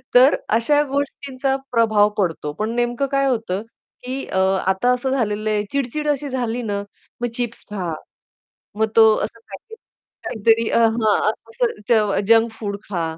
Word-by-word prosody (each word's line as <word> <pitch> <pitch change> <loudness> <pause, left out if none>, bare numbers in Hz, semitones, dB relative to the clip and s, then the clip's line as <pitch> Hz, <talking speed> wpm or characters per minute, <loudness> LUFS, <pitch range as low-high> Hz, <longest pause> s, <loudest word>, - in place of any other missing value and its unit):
तर 260 +3 +7 0.2
अशा 290 +6 +3
गोष्टींचा 275 -1 -2 0.2
प्रभाव 215 -3 +4
पडतो, 165 -6 -1
पण 215 +1 -1
नेमकं 240 +3 0
काय 275 0 +2
होतं, 220 -6 -1 0.4
की 260 +2 -4
अ, 190 - -1 0.3
आता 190 +6 +2
असं 250 +1 -2
झालेलं 215 -4 -1
आहे 210 -1 +1
चिड-चिड 280 +2 -2
अशी 285 0 -1
झाली 245 -2 -2
ना, 200 -2 -2 0.4
मग 240 - 0
चिप्स 240 -1 -4
खा, 180 -6 -3 0.8
मग 220 0 +1
तो 220 -1 +7
असं 225 +2 -8
काहीतरी 225 - -3
अ, - - +3
हां, 220 -2 +2 0.2
असं 235 +1 0 0.2
ज 210 -4 +3
जंक 225 0 +5
फूड 205 -2 -5
खा. 175 -5 -2
230 Hz, 150 wpm, -21 LUFS, 210-255 Hz, 0.8 s, तर